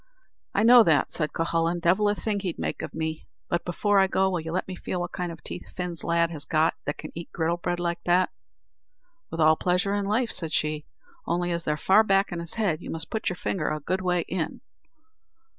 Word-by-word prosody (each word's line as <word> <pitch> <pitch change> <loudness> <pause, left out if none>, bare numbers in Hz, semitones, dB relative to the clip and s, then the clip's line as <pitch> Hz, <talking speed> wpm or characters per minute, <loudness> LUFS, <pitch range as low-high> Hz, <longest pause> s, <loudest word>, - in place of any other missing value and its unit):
"I 200 - +3
know 240 +1 +9
that," 155 -3 +3
said 155 -2 -1
Cuhullin; 165 +1 0
"divil 190 +5 +3
a 205 - +1
thing 210 0 -2
else - - -3
he'd 180 -4 -3
make - - -3
of - - -6
me; 160 -1 -3 0.2
but 170 - 0
before 200 +3 +2
I 190 - +5
go, 190 0 +2
will 180 - 0
you 160 0 -5
let 185 - -2
me 185 - -5
feel 180 - -4
what 175 0 -3
kind 180 -1 -3
of 165 -3 -11
teeth 180 - -6
Fin's 180 -2 -3
lad 170 0 +2
has 150 -3 -3
got 160 -1 +2
that 145 - -2
can - - -8
eat 170 0 -8
griddle 170 +1 0
bread 175 0 -2
like 170 -1 -2
that?" 180 +1 +3 1.0
"With 165 - -6
all 155 0 +6
pleasure 180 +4 +1
in 205 -1 0
life," 220 +3 +1
said 165 -3 -2
she; 155 0 0 0.4
"only 175 +1 0
as 170 0 -2
they're 150 0 0
far 190 +7 +5
back 195 -1 +2
in 175 - -3
his 170 0 -3
head, 200 -9 0
you - - -8
must 160 0 -4
put 220 - -1
your 180 - -3
finger 175 -2 -2
a 155 - -2
good 185 +6 -2
way 180 -1 +1
in." 170 -1 -4
175 Hz, 235 wpm, -26 LUFS, 165-190 Hz, 1.0 s, know